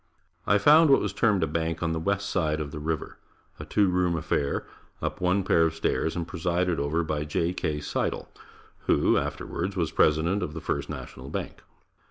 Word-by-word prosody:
I 100 - +5
found 150 +9 +6
what 135 - +6
was - - -2
termed 105 -6 +2
a - - +4
bank 80 0 -2
on 80 - 0
the 80 - -1
west 100 +3 -1
side 80 -4 0
of 75 -2 -4
the 75 - -6
river 80 0 -4 0.4
a - - -6
two 105 -2 +2
room 90 -1 +1
affair, 75 -3 -1 0.3
up - - -4
one 90 +2 +2
pair 85 - +3
of 80 -1 +2
stairs, 80 0 -1
and 85 -1 -3
presided 90 0 0
over 75 +4 0
by 75 -2 -2
J. 85 +3 -1
K. 75 -4 -2
Sidle, 75 - -2 0.6
who - - +3
afterwards 95 +3 -2
was 85 -4 -1
president 80 +6 +2
of 75 - -4
the - - -3
First 70 -2 -3
National 70 -4 -8
Bank. - - -5
80 Hz, 195 wpm, -27 LUFS, 75-90 Hz, 0.6 s, found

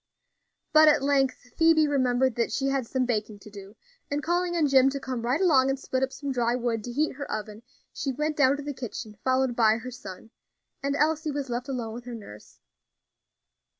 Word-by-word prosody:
But 310 0 +7
at 295 -2 +4
length 270 -3 0
Phoebe 325 -2 +5
remembered 260 -2 +2
that 235 0 -1
she 270 - -1
had 270 -3 -1
some 260 0 0
baking 215 -3 -2
to 205 +1 -14
do, 200 +1 -11 0.3
and 285 +1 -2
calling 350 +1 0
on 325 -3 +2
Jim 270 -1 +5
to 275 +1 -4
come 255 -3 -4
right 245 +5 0
along 280 -8 +4
and 270 0 -1
split 260 -1 -2
up 265 0 0
some 280 0 -5
dry 240 -2 +1
wood 235 -3 -2
to 245 - -5
heat 300 +5 0
her 280 - -6
oven, 215 0 -5 0.3
she 275 - -2
went 300 +4 -2
down 275 -1 +3
to 290 - -7
the 290 0 -4
kitchen 230 -4 -7
followed 260 -1 +1
by 220 -2 +4
her 255 +2 -7
son, 220 -3 -10 0.5
and 280 0 -1
Elsie 310 +1 +1
was 280 -3 -4
left 245 +3 -3
alone 235 -4 -4
with 240 +1 -8
her 245 -1 -6
nurse. 105 - -12
260 Hz, 210 wpm, -26 LUFS, 235-285 Hz, 0.5 s, But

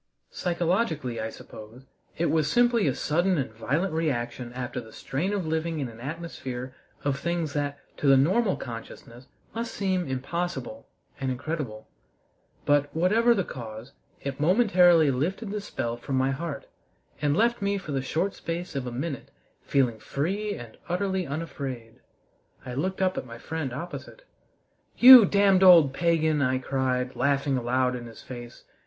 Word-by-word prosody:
Psychologically, 170 - -1
I 110 - -3
suppose, 110 +3 -12 0.3
it 170 - +1
was 155 -2 +2
simply 240 -5 +3
a 135 - +1
sudden 175 +4 +1
and 135 -5 -2
violent 150 - -1
reaction 125 -6 -2
after 125 0 -4
the 110 -1 -14
strain 160 - -3
of 200 -4 -2
living 160 0 -1
in 135 -4 -3
an 115 0 -13
atmosphere 130 -3 -6 0.3
of 140 -1 -1
things 170 -1 -2
that 145 -1 -2 0.2
to 145 - -1
the 135 -1 +7
normal 190 - +3
consciousness 120 +1 -9 0.3
must 230 0 -4
seem 185 -3 0
impossible 130 -3 -4 0.3
and 135 -1 -2
incredible. 130 -4 -4 0.8
But, 145 0 +3
whatever 220 +8 +4
the 195 - +1
cause, 115 -4 -8 0.3
it 140 0 -4
momentarily 175 - +5
lifted 185 - -2
the 210 0 -3
spell 120 -11 -4
from 135 +3 -4
my 130 +1 +2
heart, 140 0 -5 0.6
and 145 +1 +1
left 235 +1 +2
me 200 0 0
for 180 -6 -7
the 135 -1 0
short 170 +8 -1
space 170 -1 -5
of 130 -2 -3
a - - -4
minute 135 +3 -4 0.3
feeling 125 -5 +1
free 195 - -2
and 115 -2 -11
utterly 190 0 -1
unafraid. 135 -6 -6 0.7
I 125 - -6
looked 185 +8 -1
up 185 0 +1
at - - -8
my 115 -1 -9
friend 155 +1 -4
opposite. 175 - -7 0.7
"You 250 -2 +11
damned 195 -1 +4
old 170 -7 +8
pagan!" 160 -1 +2
I 130 -1 +2
cried, 130 -1 -1
laughing 140 +1 +1
aloud 125 +1 +1
in 120 -1 -7
his 115 - -12
face. 120 -2 -10
145 Hz, 160 wpm, -26 LUFS, 130-180 Hz, 0.8 s, You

